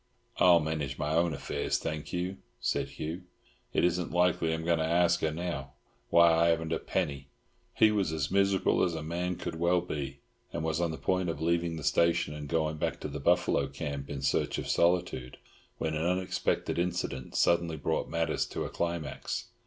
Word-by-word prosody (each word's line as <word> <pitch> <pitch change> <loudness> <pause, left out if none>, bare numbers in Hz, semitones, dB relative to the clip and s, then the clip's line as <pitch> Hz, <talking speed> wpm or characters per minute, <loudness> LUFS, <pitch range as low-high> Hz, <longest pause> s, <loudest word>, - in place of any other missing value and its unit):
"I'll 90 -2 +7
manage 75 -4 -2
my 75 +1 -1
own 85 +1 +3
affairs, 75 - -2
thank 75 -1 -4
you," 90 +2 -2 0.2
said - - 0
Hugh. 85 +4 -6 0.5
"It - - +1
isn't 90 0 +1
likely 90 -1 +2
I'm 80 0 -2
going 85 -1 +2
to - - +1
ask 85 +1 +3
her 80 - +2
now, 80 -4 -4 0.4
when 85 0 +7
I 85 0 +5
haven't 80 -1 +1
got 80 - +1
a - - -3
penny." 70 -2 -2 0.5
He 110 -1 +5
was 100 -6 +1
as 80 -2 -2
miserable 100 0 +3
as 85 -2 +1
a 80 - -4
man 90 +3 -2
could 80 - -5
well 85 +1 +3
be, 70 -5 -4 0.3
and - - -3
was 80 +1 0
on 85 - +1
the 80 - -4
point 95 -1 0
of 80 - -3
leaving 85 +1 0
the 80 - -6
station 85 +2 +2
and 75 -1 -6
going 80 -2 0
back - - -2
to - - -3
the 75 0 -5
buffalo 70 -2 +2
camp 70 0 -5
in 70 -2 -5
search - - +1
of - - -4
solitude, 85 -8 +1 0.4
when 80 - -2
an 80 +1 -1
unexpected 90 -1 0
incident 85 -7 -2
suddenly 85 -2 +2
brought 80 +2 -1
matters 80 -1 0
to - - -4
a - - -4
climax. 85 -2 -3
80 Hz, 195 wpm, -30 LUFS, 75-85 Hz, 0.5 s, I'll